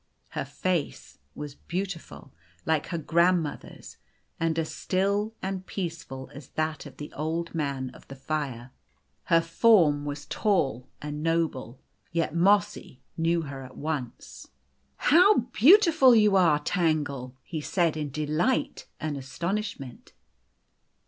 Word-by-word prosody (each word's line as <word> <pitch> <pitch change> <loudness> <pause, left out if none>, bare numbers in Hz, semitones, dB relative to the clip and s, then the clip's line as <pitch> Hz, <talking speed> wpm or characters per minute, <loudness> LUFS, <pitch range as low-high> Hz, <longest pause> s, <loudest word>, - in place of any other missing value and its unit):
Her - - -4
face 175 - -3 0.2
was 150 -1 -6
beautiful, 180 +2 -6 0.3
like 160 -2 +1
her 170 - -3
grand 170 +2 +3
mother's, 150 - -9 0.4
and 165 -1 0
as 160 -1 -2
still 200 +4 0
and 190 -1 -3
peaceful 165 -8 -6
as 140 -2 -10
that 155 -1 -3
of - - -14
the 150 - -8
Old 165 +3 -3
Man 140 -5 -2
of - - -17
the 135 - -9
Fire. 135 -3 -4 0.5
Her 165 -2 +4
form 165 -4 +4
was 145 0 -5
tall 135 - 0 0.2
and 150 0 -5
noble. 160 -7 -1 0.3
Yet 165 -2 -1
Mossy 195 -6 +1
knew 165 0 +1
her 140 -2 -7
at 130 0 -11
once. 145 -6 -5 0.3
" 70 +1 -43 0.2
How 365 +7 +7 0.2
beautiful 320 - +6
you 210 -2 +5
are, 170 -6 +5
Tangle! 145 -6 -1
" - - -47
he 155 - -1
said, 170 0 +1
in 150 -2 -3
delight 155 - -1
and 155 -2 -3
astonishment. 140 - -5
160 Hz, 135 wpm, -27 LUFS, 145-185 Hz, 0.5 s, How